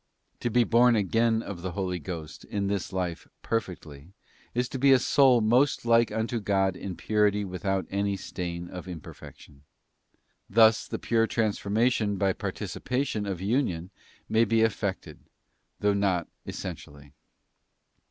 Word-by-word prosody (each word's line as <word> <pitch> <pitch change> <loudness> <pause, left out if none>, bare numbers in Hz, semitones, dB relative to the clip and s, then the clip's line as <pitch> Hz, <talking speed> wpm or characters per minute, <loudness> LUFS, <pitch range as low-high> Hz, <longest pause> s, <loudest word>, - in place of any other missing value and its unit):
To 120 - -1
be 120 +1 +4
born 120 +1 +4
again 115 +3 +2
of 90 -4 -7
the 90 -1 -4
Holy 90 -2 -2
Ghost 80 -1 -7
in 100 -1 -2
this 100 -1 -2
life 90 -3 -3 0.2
perfectly, 85 -7 -4 0.4
is 125 0 +1
to 135 - -5
be 140 +1 +5
a 135 - +8
soul 130 -1 +4
most 120 +5 +2
like 115 0 +4
unto 115 +1 -1
God 95 -2 +1
in 95 -1 -6
purity 105 0 +1
with 90 -2 -7
out 95 -2 0
any 100 0 0
stain 85 -2 -5
of 90 +1 -8
imperfection. 75 -4 -11 0.9
Thus 110 +1 +5
the - - -4
pure 115 -1 +1
transformation 110 0 0
by 95 -1 +2
participation 125 -3 -3
of 95 -3 -4
union 95 -5 -1 0.4
may 110 +1 +3
be 115 -1 +2
effected, 105 -3 -1 0.6
though 105 0 +3
not 95 -4 0 0.2
essentially. 70 0 -8
100 Hz, 145 wpm, -27 LUFS, 90-115 Hz, 0.9 s, a